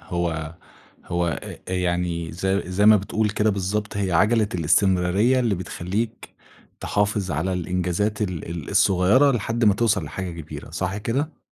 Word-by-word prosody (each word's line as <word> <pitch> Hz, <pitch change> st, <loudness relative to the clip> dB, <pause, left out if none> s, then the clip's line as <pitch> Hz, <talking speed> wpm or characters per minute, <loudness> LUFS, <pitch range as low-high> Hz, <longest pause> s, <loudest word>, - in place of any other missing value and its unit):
هو 85 Hz, -2 st, -3 dB, 0.5 s
هو 85 Hz, 0 st, -1 dB, 0.2 s
آآ -, -, -8 dB
يعني 85 Hz, -2 st, -1 dB
زي 95 Hz, +3 st, 0 dB
زي 100 Hz, +3 st, +2 dB
ما 110 Hz, 0 st, +8 dB
بتقول 105 Hz, +2 st, -1 dB
كده 105 Hz, +1 st, +1 dB
بالضبط 105 Hz, +2 st, -2 dB
هي 95 Hz, -3 st, -1 dB
عجَلة 105 Hz, +4 st, +3 dB
الاستمرارية، 95 Hz, -, +2 dB
اللي 115 Hz, -5 st, +1 dB
بتخلّيك 95 Hz, +5 st, -4 dB, 0.5 s
تحافظ 105 Hz, -2 st, 0 dB
على 80 Hz, +5 st, -1 dB
الإنجازات 90 Hz, +4 st, -1 dB
ال 90 Hz, -5 st, -4 dB
ال 85 Hz, -4 st, -6 dB
الصغيّرة 100 Hz, +8 st, +4 dB
لحد 115 Hz, 0 st, -1 dB
ما 105 Hz, -2 st, +5 dB
توصَل 115 Hz, -1 st, +1 dB
لحاجة 95 Hz, -1 st, -5 dB
كبيرة، 75 Hz, -, -9 dB
صح 95 Hz, +2 st, -3 dB
كده؟ 130 Hz, +9 st, -2 dB
95 Hz, 145 wpm, -23 LUFS, 90-105 Hz, 0.5 s, ما